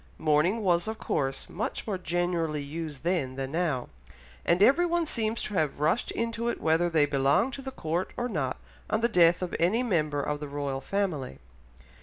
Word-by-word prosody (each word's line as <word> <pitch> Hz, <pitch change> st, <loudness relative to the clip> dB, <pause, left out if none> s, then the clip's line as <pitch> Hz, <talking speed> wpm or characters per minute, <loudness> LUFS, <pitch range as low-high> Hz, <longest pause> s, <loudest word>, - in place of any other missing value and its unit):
Mourning 160 Hz, +9 st, +2 dB
was 175 Hz, 0 st, +2 dB
of 220 Hz, 0 st, -3 dB
course 135 Hz, -8 st, -2 dB
much 215 Hz, +5 st, -4 dB
more 200 Hz, -4 st, -2 dB
generally 170 Hz, -3 st, -1 dB
used 150 Hz, -1 st, -6 dB
then 165 Hz, -7 st, 0 dB
than 135 Hz, 0 st, -4 dB
now, 155 Hz, -6 st, 0 dB, 0.6 s
and 175 Hz, +3 st, +3 dB
everyone 340 Hz, +6 st, +4 dB
seems 225 Hz, -5 st, -1 dB
to 210 Hz, -, -5 dB
have 155 Hz, -7 st, 0 dB
rushed 160 Hz, +10 st, +1 dB
into 230 Hz, 0 st, -2 dB
it -, -, -3 dB
whether 165 Hz, +2 st, +2 dB
they 155 Hz, -3 st, +4 dB
belonged 145 Hz, -, +2 dB
to 275 Hz, -, -6 dB
the 265 Hz, -, -5 dB
Court 175 Hz, -6 st, -2 dB
or 245 Hz, -, -1 dB
not 150 Hz, -, -2 dB, 0.3 s
on 215 Hz, -, +1 dB
the 235 Hz, -, +4 dB
death 175 Hz, -4 st, +4 dB
of 180 Hz, -, -3 dB
any 205 Hz, +9 st, +2 dB
member 155 Hz, -10 st, 0 dB
of 150 Hz, 0 st, -2 dB
the 150 Hz, -, -5 dB
Royal 140 Hz, -1 st, -3 dB
Family. 170 Hz, -, -2 dB
170 Hz, 185 wpm, -28 LUFS, 150-215 Hz, 0.6 s, everyone